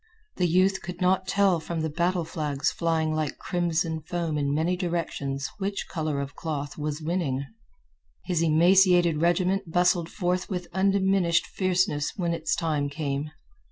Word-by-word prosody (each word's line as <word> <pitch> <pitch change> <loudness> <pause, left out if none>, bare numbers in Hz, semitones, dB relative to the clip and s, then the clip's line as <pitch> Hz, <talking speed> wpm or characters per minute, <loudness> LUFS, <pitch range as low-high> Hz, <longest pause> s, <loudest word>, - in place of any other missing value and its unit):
The 180 - +2
youth 185 +3 +2
could 180 -1 -7
not 185 0 +2
tell 195 -4 +3
from 165 0 -4
the 160 - -1
battle 175 +2 0
flags 150 -3 -1
flying 160 -2 0
like 155 -2 -2
crimson 165 -2 -1
foam 165 -1 -3
in 140 -1 0
many 160 +5 +1
directions 165 -6 -2
which 200 0 -3
color 155 -4 -2
of 140 0 -4
cloth 145 -3 -4
was 150 0 -4
winning. 155 -5 -1 0.8
His 175 -3 0
emaciated 175 0 +4
regiment 180 +1 +1
bustled 180 -1 +2
forth 180 -1 -1
with 180 -3 -3
undiminished 190 -2 +2
fierceness 185 -6 0
when 170 -3 -1
its 165 -1 -1
time 150 -4 -1
came. 145 0 -3
170 Hz, 150 wpm, -26 LUFS, 155-180 Hz, 0.8 s, emaciated